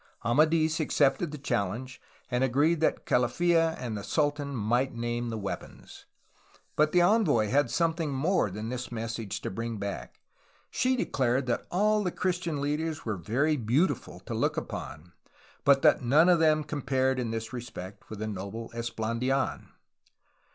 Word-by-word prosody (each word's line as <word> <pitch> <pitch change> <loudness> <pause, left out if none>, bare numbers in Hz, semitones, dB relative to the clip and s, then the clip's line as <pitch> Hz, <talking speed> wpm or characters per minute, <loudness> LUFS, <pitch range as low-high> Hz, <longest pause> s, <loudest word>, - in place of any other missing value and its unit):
Amadis 155 +5 +3
accepted 145 +1 +2
the 150 - -7
challenge, 130 0 -3 0.3
and 125 +1 +1
agreed 145 +6 +2
that 160 - 0
Calaffa 165 +6 +2
and 120 -3 -4
the 100 - -5
sultan 145 +1 -1
might 120 +4 0
name 120 0 -2
the 110 - -3
weapons. 100 -2 -7 0.7
But 150 0 +3
the 180 - +4
envoy 175 - +3
had 135 0 +2
something 165 0 0
more 140 - +1
than 105 +4 -5
this 125 0 -5
message 115 -2 -4
to - - -4
bring 115 +2 -4
back. 100 0 -6 0.5
She 255 +1 +1
declared 130 - 0
that 120 - -2
all 210 +3 +2
the 180 - 0
Christian 175 -4 -2
leaders 155 +2 -2
were 110 -3 -1
very 130 - 0
beautiful 130 - 0
to - - -6
look - - 0
upon, 80 +3 -6 0.5
but 140 -1 +4
that - - +5
none 145 +8 +5
of 175 -2 +5
them 155 -1 +3
compared 130 -3 0
in 120 -2 -2
this 115 +2 -4
respect 110 -6 -8
with 110 - -7
the 110 +1 -3
noble 105 +3 -6
Esplandidn. 120 +3 -2
130 Hz, 155 wpm, -28 LUFS, 115-155 Hz, 0.7 s, that